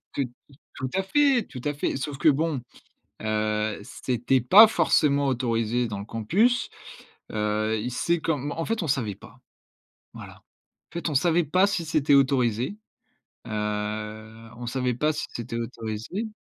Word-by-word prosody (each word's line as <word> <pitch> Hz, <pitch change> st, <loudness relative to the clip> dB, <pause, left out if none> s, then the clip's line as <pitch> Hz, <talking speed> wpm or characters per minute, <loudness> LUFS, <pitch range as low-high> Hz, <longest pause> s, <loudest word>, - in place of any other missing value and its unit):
tout 140 Hz, -, 0 dB, 0.5 s
tout 130 Hz, -1 st, -4 dB
à 190 Hz, -, +1 dB
fait, 275 Hz, +3 st, +3 dB
tout 125 Hz, -, -8 dB
à 145 Hz, 0 st, -1 dB
fait. 145 Hz, -, -2 dB
Sauf 140 Hz, 0 st, -4 dB
que 155 Hz, -, +4 dB
bon, 150 Hz, -1 st, +1 dB, 0.6 s
heu, 110 Hz, 0 st, -1 dB
c'était 125 Hz, +3 st, 0 dB
pas 205 Hz, -, +9 dB
forcément 145 Hz, -7 st, +2 dB
autorisé 120 Hz, -2 st, 0 dB
dans 100 Hz, -2 st, -5 dB
le 100 Hz, -, -6 dB
campus. 190 Hz, -, +1 dB, 0.6 s
Heu, 110 Hz, +1 st, 0 dB
y 125 Hz, +3 st, -3 dB
c'est 170 Hz, +7 st, 0 dB
comme 145 Hz, -3 st, -1 dB
en 165 Hz, -, -3 dB
fait 225 Hz, -5 st, -1 dB
on -, -, -3 dB
savait 115 Hz, -8 st, -1 dB
pas. -, -, -16 dB, 0.8 s
Voilà. -, -, -10 dB, 0.5 s
En -, -, -28 dB
fait 170 Hz, -1 st, -2 dB
on -, -, -3 dB
savait 170 Hz, +2 st, +3 dB
pas 185 Hz, +7 st, +3 dB
si 170 Hz, -4 st, -2 dB
c'était 150 Hz, -3 st, +2 dB
autorisé, 130 Hz, -, +2 dB, 0.7 s
heu, 110 Hz, +1 st, -4 dB
on 120 Hz, -1 st, -7 dB
savait 125 Hz, 0 st, -1 dB
pas 150 Hz, +4 st, +1 dB
si -, -, -3 dB
c'était 115 Hz, 0 st, -5 dB
autorisé 115 Hz, -, -5 dB
130 Hz, 155 wpm, -25 LUFS, 110-160 Hz, 0.8 s, pas